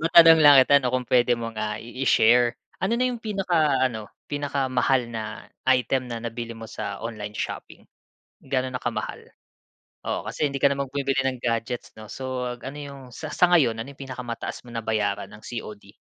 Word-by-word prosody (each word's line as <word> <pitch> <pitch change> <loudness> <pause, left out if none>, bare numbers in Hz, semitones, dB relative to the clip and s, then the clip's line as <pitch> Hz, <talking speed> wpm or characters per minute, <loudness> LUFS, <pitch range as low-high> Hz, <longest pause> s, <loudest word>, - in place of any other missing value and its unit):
matanong 165 0 +8
lang 145 -2 +9
kita, 140 - +3
'no, 125 -1 -1
kung 125 -1 -1
puwede 125 -1 +4
mong, 115 -1 -6
ah, 105 0 -2
i 125 +3 -5
i-share, 120 +1 +4 0.2
ano 190 +5 0
na 250 - +1
'yung 240 -2 -4
pinaka-ano 155 - +1 0.2
pinakamahal 135 -3 0
na 110 -2 -6 0.2
item 130 0 +1
na 115 - -3
nabili 115 0 -5
mo 115 0 -8
sa 100 -3 -5
online 105 -2 -6
shopping? - - -6 0.6
Gaano 130 -1 -1
na 125 - -2
kamahal? - - -4 0.8
Oo, - - -2
kasi 150 - 0
hindi 140 0 -4
ka 140 - +6
naman 140 -1 -2
bumibili 135 -1 0
ng 130 -1 -1
gadgets, 115 +1 -2
'no, 110 -1 -11
so 125 -2 -4
ano 140 +3 -7
'yung 140 -1 -8
sa 155 - -6
sa 180 - +4
ngayon, 125 -10 +4
ano 115 - -5
'yung 140 - -16
pinakamataas 125 -2 -6
mo - - -11
nabayaran 110 -3 -1
ng 110 - -13
COD? 105 -3 -8
125 Hz, 180 wpm, -25 LUFS, 115-140 Hz, 0.8 s, lang